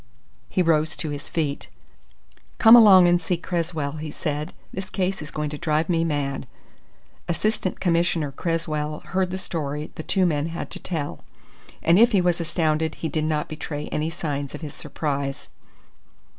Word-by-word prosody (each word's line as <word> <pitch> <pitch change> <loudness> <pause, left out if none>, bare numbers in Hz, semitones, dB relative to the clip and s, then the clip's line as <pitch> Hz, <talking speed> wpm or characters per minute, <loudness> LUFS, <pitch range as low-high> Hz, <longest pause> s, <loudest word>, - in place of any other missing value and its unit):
He 185 - +1
rose 160 -2 +2
to 155 - -3
his 145 -1 -6
feet. 150 -4 -2 0.9
"Come 225 -1 +9
along 195 -6 +9
and 175 0 +3
see 175 +1 -1
Cresswell," 165 -4 -2
he 155 0 -5
said. 150 +1 -3 0.2
"This 190 0 -5
case 190 -1 -1
is 150 - -7
going 150 -2 -3
to 150 - -6
drive 155 0 0
me 165 -2 +2
mad!" 140 -4 -2 0.8
Assistant 185 +2 -1
Commissioner 170 -4 +1
Cresswell 155 -1 -2
heard 185 0 -1
the 185 - -3
story 150 -4 -4
the - - -6
two 190 +3 +1
men 150 -3 +1
had 165 0 -5
to - - -5
tell, 155 -5 -4 0.6
and 170 +4 +5
if 235 +1 +6
he 200 - +5
was 175 -1 +1
astounded 160 -1 0
he 160 - -3
did 155 +1 -1
not 155 -1 0
betray 150 -1 -5
any 155 +1 -1
signs 145 -4 -4
of 150 - -9
his 150 -3 -6
surprise. 140 -2 -3
160 Hz, 170 wpm, -24 LUFS, 150-175 Hz, 0.9 s, Come